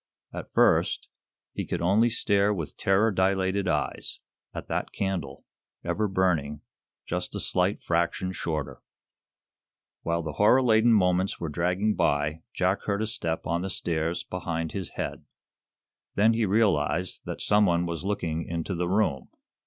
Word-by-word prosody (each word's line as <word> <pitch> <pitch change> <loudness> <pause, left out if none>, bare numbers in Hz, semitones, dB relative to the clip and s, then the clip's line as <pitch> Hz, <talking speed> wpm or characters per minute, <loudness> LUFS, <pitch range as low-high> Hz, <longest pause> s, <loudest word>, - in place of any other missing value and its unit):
At - - -7
first, - - +3 0.4
he - - -3
could - - -3
only 100 +7 +3
stare, 100 -3 +2
with 85 -7 -4
terror 100 +4 +2
dilated 95 0 +1
eyes, - - -2 0.3
at - - -7
that - - -2
candle 90 -9 -3 0.4
ever 105 0 0
burning 85 -7 0 0.4
just - - -3
a - - -2
slight 90 +2 0
fraction 85 +2 0
shorter! 75 -7 -4 1.2
While 85 0 -1
the 80 - -3
horror 125 +5 +6
laden 115 -1 +4
moments 95 -2 +2
were 85 - -3
dragging 90 +7 0
by 75 0 0
Jack 95 +2 0
heard 100 +1 0
a - - 0
step 80 -7 -3
on 85 +1 0
the 95 - -3
stairs 85 -1 -1
behind 85 -3 -3
his 95 -4 -4
head. - - -4 0.9
Then 110 +3 +4
he 110 -2 +1
realized 95 -4 +1
that - - -5
some 105 0 +3
one 85 0 +2
was 85 -1 -4
looking 85 -5 -2
into 85 +3 -3
the 90 0 -1
room. 90 -10 0
90 Hz, 150 wpm, -27 LUFS, 85-100 Hz, 1.2 s, horror